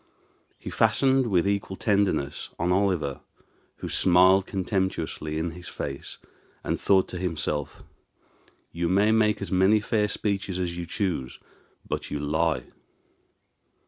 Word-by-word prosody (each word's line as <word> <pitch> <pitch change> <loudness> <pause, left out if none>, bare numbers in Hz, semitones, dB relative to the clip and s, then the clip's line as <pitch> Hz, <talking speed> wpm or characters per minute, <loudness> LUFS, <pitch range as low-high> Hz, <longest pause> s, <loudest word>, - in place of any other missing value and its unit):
He - - -8
fastened 130 +3 +3
with 95 -3 +2
equal 100 -1 -1
tenderness 100 -9 0
on 85 +2 0
Oliver, 90 -7 0 0.5
who - - -7
smiled 95 +2 +5
contemptuously 95 -5 -2
in 80 +1 -2
his 90 +2 -10
face, 70 -1 -6 0.5
and - - -2
thought 95 -1 +3
to 90 - -5
himself, 75 -5 -3 0.9
"You 85 0 -2
may 100 +4 +3
make 105 -2 +2
as - - -7
many 95 +3 +4
fair 105 0 0
speeches 100 -3 -2
as 90 -2 -2
you 85 -1 -5
choose, 90 -11 -2 0.5
but - - -4
you 75 - -3
lie." 75 -2 0
95 Hz, 130 wpm, -26 LUFS, 85-100 Hz, 0.9 s, smiled